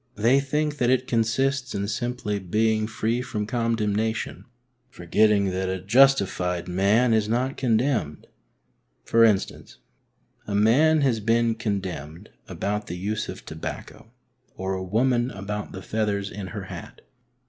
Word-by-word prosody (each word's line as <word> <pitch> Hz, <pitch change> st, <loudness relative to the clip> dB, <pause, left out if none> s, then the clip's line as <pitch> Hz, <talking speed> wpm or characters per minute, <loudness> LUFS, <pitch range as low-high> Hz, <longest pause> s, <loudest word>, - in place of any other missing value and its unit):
They 115 Hz, +6 st, +4 dB
think 150 Hz, +2 st, -1 dB
that 120 Hz, -, +2 dB
it 130 Hz, 0 st, +2 dB
consists 125 Hz, +3 st, 0 dB
in 100 Hz, 0 st, -2 dB
simply 115 Hz, -2 st, -2 dB
being 110 Hz, +3 st, +1 dB
free 115 Hz, +2 st, -1 dB
from 110 Hz, -4 st, -3 dB
condemnation, 110 Hz, -1 st, -1 dB, 0.4 s
forgetting 100 Hz, +2 st, +2 dB
that 95 Hz, 0 st, -2 dB
a 95 Hz, 0 st, -2 dB
justified 95 Hz, -6 st, +3 dB
man 100 Hz, +7 st, +3 dB
is 110 Hz, -1 st, +1 dB
not 125 Hz, +4 st, 0 dB
condemned. 115 Hz, -, 0 dB, 0.8 s
For 115 Hz, 0 st, +4 dB
instance, 105 Hz, -4 st, 0 dB, 0.7 s
a 100 Hz, -, -2 dB
man 145 Hz, +10 st, +4 dB
has 130 Hz, -5 st, +2 dB
been 115 Hz, +2 st, +2 dB
condemned 95 Hz, -8 st, -5 dB, 0.2 s
about 105 Hz, +1 st, -3 dB
the 90 Hz, -, -5 dB
use 105 Hz, +4 st, -3 dB
of -, -, -8 dB
tobacco, 80 Hz, +7 st, -8 dB, 0.4 s
or 95 Hz, 0 st, -3 dB
a 95 Hz, -, -3 dB
woman 120 Hz, +5 st, +1 dB
about 105 Hz, -1 st, -5 dB
the 95 Hz, -, -8 dB
feathers 105 Hz, -2 st, -2 dB
in 100 Hz, -2 st, -6 dB
her 85 Hz, -, -6 dB
hat. -, -, -9 dB
110 Hz, 135 wpm, -25 LUFS, 100-120 Hz, 0.8 s, They